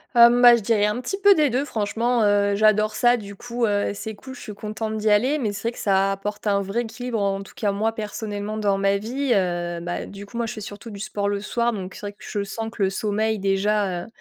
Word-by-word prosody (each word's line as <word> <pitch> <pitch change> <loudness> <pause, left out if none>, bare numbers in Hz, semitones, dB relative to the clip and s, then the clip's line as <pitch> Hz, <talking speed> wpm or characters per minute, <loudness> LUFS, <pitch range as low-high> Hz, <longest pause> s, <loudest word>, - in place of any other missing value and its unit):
Hum, 240 +1 +7
bah, 240 -1 +10
je 235 - -2
dirais 210 -1 +2
un 210 +4 -1
petit 320 +10 -3
peu 405 0 +6
des 305 -6 +3
2, 255 +4 0
franchement, 230 +1 0
heu, 205 0 +3
j'adore 215 0 +3
ça, 245 0 +4
du 200 -3 -9
coup, 240 +2 -2
heu, 205 -1 0
c'est 220 +2 -5
cool, 260 +5 -11
je - - -11
suis 210 - -7
contente 215 +1 -4
d'y 215 0 +1
aller. 255 +9 +3
Mais 215 -6 -1
c'est 215 +3 -2
vrai - - -5
que - - -12
ça 195 -1 +2
apporte 205 +2 -5
un 200 -1 +2
vrai 195 +5 -2
équilibre, 235 0 -4
en 195 -1 0
tout 195 - -12
cas, 205 -2 0
moi, 220 +3 0
personnellement, 210 -1 -4
dans 200 -2 +1
ma 195 0 +2
vie, 250 +5 -1
heu. 175 -3 -1
Bah, 175 +1 -4
du 200 0 -10
coup, 235 +3 -9
moi, 235 - 0
je 220 - -4
fais 215 - -8
surtout 205 +3 -8
du 200 - -8
sport 205 -1 -2
le 205 0 -1
soir, 235 +2 0
donc 190 -2 -6
c'est - - -10
vrai 205 0 -5
que - - -40
je 205 - -4
sens 225 +3 -5
que 210 - -2
le 190 - +2
sommeil, 215 +2 -1
déjà, 195 -2 0
heu, - - -11
210 Hz, 265 wpm, -23 LUFS, 200-235 Hz, -, bah